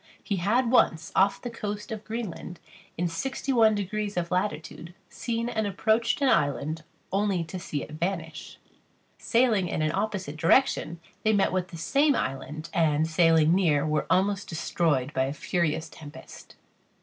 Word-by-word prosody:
He 200 Hz, -, -2 dB
had 230 Hz, +7 st, +1 dB
once, 165 Hz, -10 st, +3 dB
off 195 Hz, +1 st, +3 dB
the 245 Hz, -, -4 dB
coast 210 Hz, -2 st, -5 dB
of 215 Hz, -1 st, -5 dB
Greenland, 215 Hz, -6 st, -6 dB, 0.4 s
in 175 Hz, +1 st, 0 dB
sixty 265 Hz, +10 st, -3 dB
one 220 Hz, -3 st, +5 dB
degrees 205 Hz, 0 st, -3 dB
of 170 Hz, 0 st, -2 dB
latitude, 175 Hz, -2 st, -3 dB
seen 230 Hz, -1 st, -3 dB
and 220 Hz, -3 st, -1 dB
approached 220 Hz, +4 st, +1 dB
such -, -, -12 dB
an 270 Hz, -, +4 dB
island 155 Hz, +1 st, -1 dB, 0.3 s
only 195 Hz, -2 st, +1 dB
to 175 Hz, +3 st, -7 dB
see 145 Hz, -4 st, -4 dB
it -, -, -10 dB
vanish. 160 Hz, -1 st, -4 dB, 0.6 s
Sailing 230 Hz, -6 st, +2 dB
in 155 Hz, -, -1 dB
an 155 Hz, -, +1 dB
opposite 195 Hz, -6 st, -3 dB
direction, 170 Hz, -, +2 dB, 0.2 s
they 220 Hz, -, +2 dB
met 200 Hz, -2 st, +2 dB
with 185 Hz, -1 st, -1 dB
the 170 Hz, -, -10 dB
same 280 Hz, -, +2 dB
island, 150 Hz, -, -4 dB
and 155 Hz, -2 st, +2 dB
sailing 165 Hz, -1 st, +4 dB
near, 160 Hz, -6 st, +2 dB
were 155 Hz, 0 st, 0 dB
almost 195 Hz, +3 st, +1 dB
destroyed 155 Hz, -4 st, 0 dB
by 130 Hz, 0 st, +1 dB
a 135 Hz, -, -3 dB
furious 160 Hz, -1 st, -1 dB
tempest. 150 Hz, -2 st, -12 dB
180 Hz, 160 wpm, -27 LUFS, 160-215 Hz, 0.6 s, one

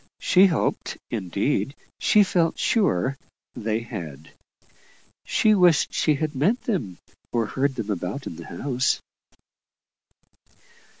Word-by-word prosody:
She 190 Hz, +2 st, +5 dB
hoped 165 Hz, -5 st, -1 dB
indeed, 105 Hz, -, -1 dB, 0.2 s
she 210 Hz, -, +5 dB
felt 170 Hz, -4 st, +1 dB
sure 135 Hz, -, +1 dB, 0.4 s
they 110 Hz, +1 st, -2 dB
had. 80 Hz, -, -8 dB, 0.9 s
She 215 Hz, -, +3 dB
wished 180 Hz, -6 st, +4 dB
she 155 Hz, -, +2 dB
had 155 Hz, +1 st, -2 dB
met 180 Hz, -, +1 dB
them, 125 Hz, -, -2 dB, 0.3 s
or 115 Hz, -2 st, +1 dB
heard 135 Hz, +4 st, -1 dB
them 110 Hz, -4 st, -3 dB
about 100 Hz, +8 st, -4 dB
in -, -, -6 dB
the 85 Hz, -, -10 dB
house. 130 Hz, +8 st, -1 dB
135 Hz, 115 wpm, -24 LUFS, 100-165 Hz, 0.9 s, She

